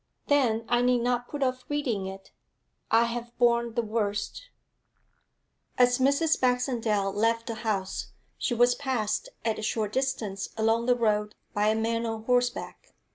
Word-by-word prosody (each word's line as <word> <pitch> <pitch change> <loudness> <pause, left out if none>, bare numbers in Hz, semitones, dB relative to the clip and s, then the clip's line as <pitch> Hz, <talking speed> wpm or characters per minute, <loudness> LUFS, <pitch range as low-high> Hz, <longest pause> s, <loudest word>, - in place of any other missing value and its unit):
'Then 235 -6 +2
I 240 +1 +2
need 245 -1 +3
not 245 0 0
put 290 -2 -3
off 255 -1 -1
reading 245 -10 -1
it. 195 0 -9 0.6
I 230 +1 +5
have 235 0 -4
borne 235 -1 +2
the 235 - +1
worst.' 215 - -3 1.3
As 245 0 +4
Mrs. 280 +5 +2
Baxendale 235 -6 +1
left 230 +2 +1
the 230 - -3
house, 200 -4 -2 0.3
she 240 - -1
was 245 +1 +5
passed 245 -5 -2 0.2
at 225 -2 0
a - - -4
short 215 -1 -1
distance 220 -7 -2
along 225 +2 +2
the 245 - +5
road 210 -3 0 0.2
by 205 +1 +1
a 215 - +3
man 230 +1 0
on 225 -1 -4
horseback. 245 +1 -1
235 Hz, 155 wpm, -27 LUFS, 215-250 Hz, 1.3 s, I